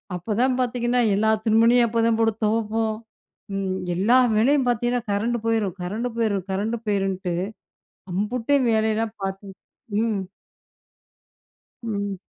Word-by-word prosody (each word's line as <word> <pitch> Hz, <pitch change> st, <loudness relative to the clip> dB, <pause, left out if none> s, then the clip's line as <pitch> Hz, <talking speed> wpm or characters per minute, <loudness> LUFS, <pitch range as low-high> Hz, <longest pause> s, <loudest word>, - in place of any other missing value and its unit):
அப்போ 180 Hz, +5 st, -5 dB
தான் 255 Hz, 0 st, +2 dB
பார்த்தீங்கன்னா, 245 Hz, 0 st, 0 dB
எல்லா 220 Hz, +2 st, +2 dB
துணிமணியும் 230 Hz, +2 st, +5 dB
அப்போதான் 230 Hz, 0 st, +2 dB
போட்டு 225 Hz, -1 st, +3 dB
துவைப்போம். 220 Hz, 0 st, 0 dB, 0.6 s
ம். 190 Hz, -1 st, -2 dB, 0.2 s
எல்லா 215 Hz, +8 st, +4 dB, 0.2 s
வேலையும் 260 Hz, +4 st, +3 dB
பார்த்தீங்கன்னா, 240 Hz, 0 st, 0 dB
கரண்ட் 225 Hz, +4 st, 0 dB
போயிரும் 220 Hz, -5 st, 0 dB
கரண்ட் 215 Hz, +7 st, -3 dB
போயிரும் 205 Hz, -5 st, 0 dB
கரண்ட் 210 Hz, +5 st, -1 dB
போயிருன்ட்டு 195 Hz, -3 st, -1 dB, 0.8 s
அம்புட்டு 225 Hz, +8 st, 0 dB
வேலையெல்லாம் 220 Hz, 0 st, 0 dB
பார்த்து. 195 Hz, +1 st, -5 dB, 0.5 s
ம். 225 Hz, -3 st, 0 dB, 1.6 s
ம். 205 Hz, -3 st, -3 dB
220 Hz, 110 wpm, -23 LUFS, 200-235 Hz, 1.6 s, துணிமணியும்